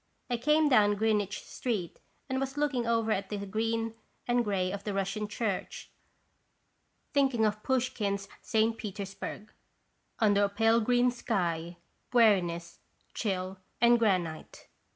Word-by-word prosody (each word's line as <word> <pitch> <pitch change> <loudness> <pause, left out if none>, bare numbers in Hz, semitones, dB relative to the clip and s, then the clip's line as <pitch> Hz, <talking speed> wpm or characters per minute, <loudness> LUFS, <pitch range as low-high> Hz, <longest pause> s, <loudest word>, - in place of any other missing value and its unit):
I 240 - +1
came 300 +5 +3
down 210 -6 +5
Greenwich 210 -2 0
street 210 -9 -3 0.3
and 260 -1 -1
was 270 +1 -3
looking 275 -5 0
over 230 -1 +1
at 195 -2 -1
the 210 - -3
green 225 +2 -1 0.3
and 240 0 +2
gray 190 -4 0
of 200 0 -5
the 205 -1 -3
Russian 195 +2 -2
Church, 205 -2 -4 1.2
thinking 265 -6 +3
of 210 0 0
Pouch 255 +1 0
kine's 200 -2 -2
St. 220 +1 +1
Petersburg: 205 +1 -6 0.3
" - - -45
Under 205 -3 +4
a - - -1
pale 225 +3 +3
green 245 +2 +3
sky, 175 -8 -2 0.4
Weariness, 180 -8 +3 0.3
chill, 190 -3 -2 0.2
and 240 0 +5
granite 180 -8 -1
215 Hz, 135 wpm, -30 LUFS, 195-235 Hz, 1.2 s, down